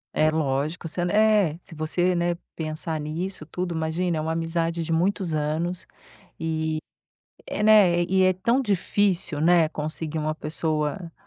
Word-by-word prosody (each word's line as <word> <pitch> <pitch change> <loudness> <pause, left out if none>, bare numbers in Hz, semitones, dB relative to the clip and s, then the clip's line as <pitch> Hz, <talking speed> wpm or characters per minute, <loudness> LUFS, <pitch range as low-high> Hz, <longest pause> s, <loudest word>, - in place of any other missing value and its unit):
É 155 - +3
lógico 155 +2 -1
se 170 - -7
ela 175 0 0
eh, 210 -7 +4
se - - -13
você, 170 +3 0
né, 175 0 +1 0.2
pensar 155 0 -4
nisso 155 +3 -4
tudo, 175 +2 -4
imagina, 160 +2 -1
é - - -1
uma 160 +1 -1
amizade 165 0 -1
de 165 - -4
muitos 175 +1 0
anos 160 +4 -2 0.5
e, 160 -1 -2 0.8
né, 205 -5 +6
e 190 +2 +2
é 185 0 +5
tão 235 +8 +1
difícil, 195 - +1
né, 165 0 +4
conseguir 155 0 -3
uma 155 0 -1
pessoa, 155 +3 -2
165 Hz, 150 wpm, -25 LUFS, 155-180 Hz, 0.8 s, né